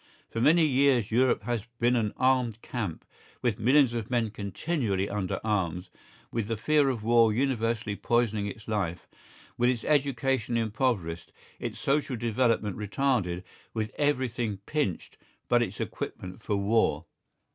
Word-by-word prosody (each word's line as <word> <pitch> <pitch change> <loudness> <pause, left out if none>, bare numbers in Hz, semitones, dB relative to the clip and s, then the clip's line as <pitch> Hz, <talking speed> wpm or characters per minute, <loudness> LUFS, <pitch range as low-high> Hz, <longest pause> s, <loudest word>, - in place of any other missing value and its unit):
For 115 - -2
many 160 +5 +5
years 135 -6 +3
Europe 125 +2 +3
has 120 -3 -2
been 120 +1 +3
an 110 -3 +1
armed 125 -3 +1
camp, 105 -10 -4 0.4
with 120 -4 0
millions 130 +1 +4
of 115 -3 -3
men 120 -4 0
continually 100 - -2
under 100 -3 -2
arms, 95 -4 -1 0.4
with 115 -3 -2
the 115 -1 -2
fear 145 +4 +3
of 120 -5 -3
war 115 0 +5
universally 115 -3 0
poisoning 110 -3 +1
its 105 +2 -8
life, 95 -6 -2 0.5
with 120 +1 +4
its 120 -3 -1
education 135 -5 +1
impoverished, 110 -7 -1 0.3
its - - -4
social 140 -1 0
development 115 -3 0
retarded, 105 -5 0 0.3
with 110 -1 -2
everything 125 -7 0
pinched 145 - -2 0.3
but - - +4
its - - -3
equipment 90 +4 -5
for 105 - -1
war. 100 -6 +1
115 Hz, 140 wpm, -28 LUFS, 105-130 Hz, 0.5 s, many